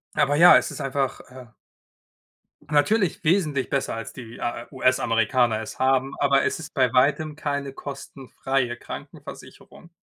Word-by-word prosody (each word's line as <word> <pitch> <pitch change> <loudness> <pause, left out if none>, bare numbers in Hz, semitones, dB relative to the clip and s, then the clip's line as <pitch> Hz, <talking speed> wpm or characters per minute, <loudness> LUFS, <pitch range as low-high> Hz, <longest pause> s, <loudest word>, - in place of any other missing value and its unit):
Aber 145 +1 +2
ja, 175 +3 +8
es - - -3
ist - - -8
einfach, 135 -1 -2
äh 130 -1 -12 1.2
natürlich 180 +6 +1
wesentlich 155 -6 +1
besser, 140 - -1
als 115 - -7
die, 120 -2 -10
äh, 120 0 -4
US-Amerikaner 120 -3 +1
es 110 - -8
haben, 135 +1 +1
aber 140 -1 +3
es - - -1
ist 160 - -9
bei 130 -4 +2
Weitem 150 +4 +2
keine 140 -2 -4
kostenfreie 135 -2 -4
Krankenversicherung. 170 - -11
135 Hz, 140 wpm, -24 LUFS, 125-145 Hz, 1.2 s, ja